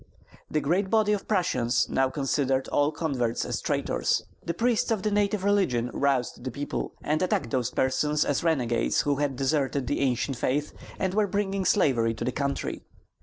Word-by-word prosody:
The 155 - 0
great 185 +6 +1
body 215 -1 +3
of 205 - -3
Prussians 130 - +1
now 135 0 +1
considered 135 -1 0
all 145 +1 +2
converts 135 -7 -1
as - - -3
traitors. - - 0 0.2
The 170 - -3
priests 235 +1 +1
of 220 -4 0
the 215 - 0
native 205 -1 +1
religion 180 -13 +1
roused 135 -4 0
the 130 - -3
people, 140 +4 -4
and 155 +1 0
attacked 140 -9 0
those 125 -2 0
persons 150 +4 +1
as 145 +1 0
renegades 125 -8 +1
who 145 -1 0
had 145 -2 0
deserted 135 0 0
the 145 - -1
ancient 130 0 0
faith 145 +5 -1 0.2
and 190 -1 -1
were 210 0 +2
bringing 195 -1 -1
slavery 120 - +2
to 115 - -4
the 125 - 0
country. 140 +1 -2
145 Hz, 175 wpm, -27 LUFS, 130-190 Hz, 0.2 s, body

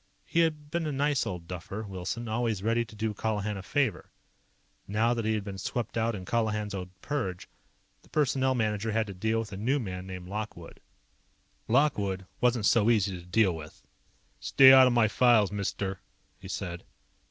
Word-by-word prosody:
He 170 - 0
had 155 -3 0
been 170 -2 -1
a - - -1
nice 145 0 +1
old 85 -2 -6
duffer, 100 +5 -6
Wilson, 100 +4 -5
always 110 -3 -1
ready 115 +2 +2
to 110 - -14
do 110 0 -2
Colihan 105 0 -2
a 95 - -6
favor. 120 +1 -1 0.8
Now 110 +4 +2
that 115 -2 -3
he 110 0 +1
had 105 - -2
been 100 -1 -7
swept 115 +4 -3
out 115 0 0
in 95 -2 -7
Colihan's 105 -1 -1
own 90 -2 -5
purge, 95 -12 -3 0.5
the - - -23
Personnel 130 -3 +1
Manager 110 -1 -1
had 110 0 +1
to 100 - -7
deal 110 +4 -1
with 110 -1 -3
a 95 - -6
new 125 +8 +1
man 95 -7 -5
named 90 -1 -7
Lockwood. 105 +2 -6 0.9
Lockwood 105 -8 +1
wasn't 120 -3 +2
so 115 0 +4
easy 100 -4 +2
to - - -13
deal 95 -1 +3
with. 75 -1 -11 0.6
"Stay 135 -1 +7
out 130 -1 +8
of 125 - +2
my 120 -2 +4
files, 110 -3 +4
mister," 100 -1 -3 0.4
he 95 - -10
said. 90 -2 -5
110 Hz, 185 wpm, -29 LUFS, 95-120 Hz, 0.9 s, out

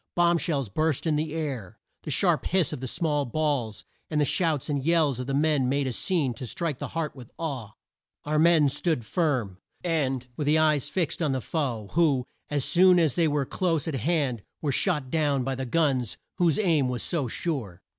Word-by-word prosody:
Bomb 175 -1 +3
shells 140 -7 -1
burst 155 - 0
in 160 -2 +2
the 155 +1 -1
air. 140 - -4 0.2
The - - -7
sharp - - +2
hiss 180 -5 +1
of 140 - -6
the 130 - -3
small 150 +1 0
balls, 135 -5 -2 0.2
and 155 - 0
the 145 - +3
shouts 155 -2 0
and 145 -3 -1
yells 155 -5 +2
of 125 - -4
the 135 - -2
men 145 -3 +2
made 140 +1 +1
a 130 - -1
scene 145 -1 0
to 120 +2 -7
strike 160 0 -3
the - - -4
heart 155 -3 -2
with 125 -4 -11
awe. 135 -10 -4 0.5
Our 150 +1 +1
men 160 -2 +5
stood 145 -4 -1
firm, 125 - -1 0.2
and 135 -7 0
with 145 +1 -1
eyes 155 -2 +3
fixed 175 -2 -1
on 150 -4 +1
the 130 - 0
foe, 120 -11 -3
who, 150 -7 +2 0.2
as 145 -3 0
soon 180 +1 +5
as 160 -6 +3
they 170 -2 +2
were 145 -2 0
close 165 0 -1
at 160 - -2
hand, 135 -3 0 0.2
were 145 - -1
shot 150 -4 0
down 145 -4 +1
by 135 +1 -2
the 130 0 -4
guns 130 -5 0 0.2
whose 170 -4 +3
aim 160 -10 +2
was 125 -1 -2
so 155 -7 -1
sure. 120 - -4
150 Hz, 205 wpm, -26 LUFS, 130-165 Hz, 0.5 s, men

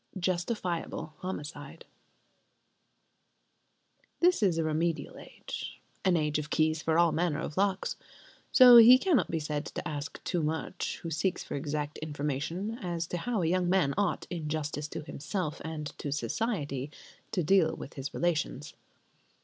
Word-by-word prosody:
Justifiable 175 -3 -2
Homicide 150 -4 -7 2.3
This 355 -4 +4
is 185 -5 +3
a 165 - +1
remedial 160 +1 -1
age, - - -8 0.2
an 185 -3 +3
age 150 -1 0
of 150 0 -5
keys 155 0 +1
for 160 +1 +1
all 170 -1 +5
manner 165 -3 0
of 150 - -5
locks; 195 -1 0 0.5
so 250 -2 +10
he 235 +2 +10
cannot 325 +1 +2
be 165 - -1
said 150 -1 -2
to - - -5
ask 145 0 -5
too 175 - -1
much 160 +1 -3
who 165 - -4
seeks 180 +4 -1
for - - -7
exact 150 +1 -3
information 155 - -3
as 170 -3 -2
to 175 - -4
how 220 0 -1
a - - +1
young 180 +1 +1
man 180 -7 +3
ought, 200 -2 0
in 160 -4 -4
justice 150 -1 -3
to - - -6
himself 155 +2 -4
and 155 -1 -5
to 145 - -4
society, 145 - -2 0.4
to 190 -6 0
deal 165 -1 +3
with - - -9
his 140 +1 -5
relations. 155 -4 -1
165 Hz, 150 wpm, -30 LUFS, 150-185 Hz, 2.3 s, so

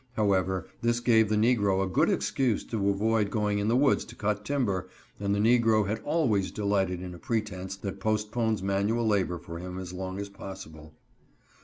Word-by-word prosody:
However, 95 -4 +1 0.2
this 120 0 +1
gave 115 -3 +4
the 110 - +2
negro 105 -4 +3
a - - -1
good 95 - +2
excuse 125 -6 0
to 100 -3 -1
avoid 105 +1 +1
going 105 -1 0
in 100 - -1
the 115 - +3
woods 140 0 +3
to 120 - -12
cut 105 -1 -1
timber, 105 -9 -1 0.3
and 100 0 0
the - - -1
negro 110 -1 +4
has 105 +2 -1
always 125 - +1
delighted 95 -3 -1
in 90 -1 -6
a 85 - -11
pretense 105 -5 -3
that 100 -1 -6
postpones 110 0 0
manual 100 +4 +1
labor 95 -4 +1
for 85 0 -8
him 90 +1 -6
as 90 -1 -6
long 95 +1 -5
as 100 - -4
possible. 80 -6 -10
100 Hz, 185 wpm, -28 LUFS, 95-110 Hz, 0.3 s, gave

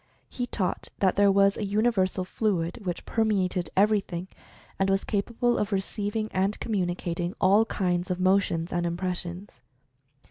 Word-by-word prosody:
He 245 -1 -4
taught 190 -7 -2
that 190 -2 +2
there 200 0 +5
was 200 0 +4
a - - -3
universal 200 -3 +1
fluid 185 -1 -1
which 175 - -3
perme 215 -4 +1
ated 180 -2 -3
everything, 195 -3 +1 0.5
and 195 0 +2
was 195 0 +2
capable 235 +4 0
of 210 +1 -1
receiving 205 +2 -2
and 195 +3 0
communicating 175 -3 -2
all 200 +4 +5
kinds 180 -4 -1
of 180 0 -1
motions 185 -3 +1
and 175 0 0
impressions. 180 +2 -5
195 Hz, 145 wpm, -27 LUFS, 180-205 Hz, 0.5 s, there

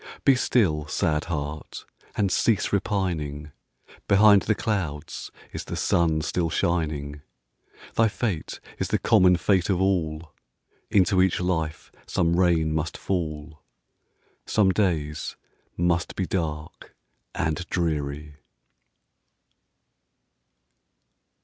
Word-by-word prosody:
Be 135 - +7
still, 90 - +1
sad 75 0 0
heart! 75 -2 -5 0.3
and 100 -3 +1
cease 105 0 +1
repining; 85 -8 -2 0.6
Behind 100 0 +6
the 110 - +1
clouds 85 -10 -3 0.2
is - - -5
the - - -5
sun 80 -2 +2
still 80 +2 -1
shining; 75 -4 -1 0.7
Thy 115 - +4
fate 105 -6 -3 0.2
is - - -1
the - - +1
common 90 -1 +5
fate 90 +1 +1
of 95 -3 +2
all, 80 -5 -1 0.6
Into 95 -1 +4
each 95 -1 +2
life 80 -4 -2 0.2
some 85 0 +1
rain 80 -4 +3
must 80 0 -2
fall, 80 -4 -4 0.9
Some 100 -3 +3
days 80 -7 -1 0.4
must 85 0 0
be 95 - -1
dark 80 -4 -4 0.4
and 80 +3 -1
dreary. 75 -3 -2
85 Hz, 105 wpm, -25 LUFS, 75-95 Hz, 0.9 s, Be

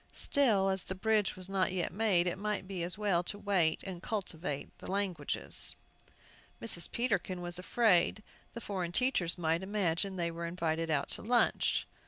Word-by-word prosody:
Still, 215 -9 +3
as 190 0 0
the 190 - -5
bridge 215 +1 +1
was 185 0 -7
not 190 -1 0
yet 180 -2 -2
made, 195 -4 +2
it 175 +1 -2
might 210 -2 -2
be 190 -3 -5
as 170 +2 0
well 200 -5 +1
to 190 +3 -3
wait 195 -6 +1
and 185 -3 -7
cultivate 180 -9 -4
the - - -9
languages. 195 -2 +1 0.8
Mrs. 195 -7 +1
Peterkin 200 -6 -1
was 175 0 -4
afraid 210 0 +2 0.3
the 235 - -7
foreign 185 -5 -4
teachers 190 -8 +1
might 165 0 0
imagine 190 -1 -1
they 170 -2 -2
were 170 0 -5
invited 165 -1 -2
out 150 -3 0
to - - -3
lunch. 240 +3 +2
185 Hz, 170 wpm, -32 LUFS, 170-205 Hz, 0.8 s, Still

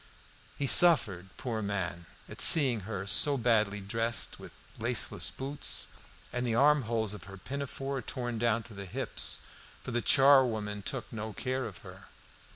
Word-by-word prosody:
He 140 - -3
suffered, 115 - +4
poor 115 -4 -5
man, 90 -4 -6 0.2
at - - -8
seeing 135 -8 +8
her 100 -3 -6
so 140 +8 +2
badly 110 -4 -1
dressed, 115 +3 -2
with - - -13 0.3
laceless - - +3
boots, 140 +2 0 0.4
and 125 - -4
the 120 -2 -2
arm 145 0 +2
holes 110 -3 -3
of 95 -4 -11
her 95 0 -13
pinafore 135 +3 -7
torn 120 -2 -6
down 115 -1 -1
to 115 - -14
the 100 -1 -10
hips; - - -3 0.4
for - - -8
the 120 0 -3
charwoman 120 -8 +2
took 125 +4 -7
no 110 0 -7
care 130 +3 -5
of 105 -6 -12
her. - - -14
115 Hz, 160 wpm, -28 LUFS, 105-135 Hz, 0.4 s, seeing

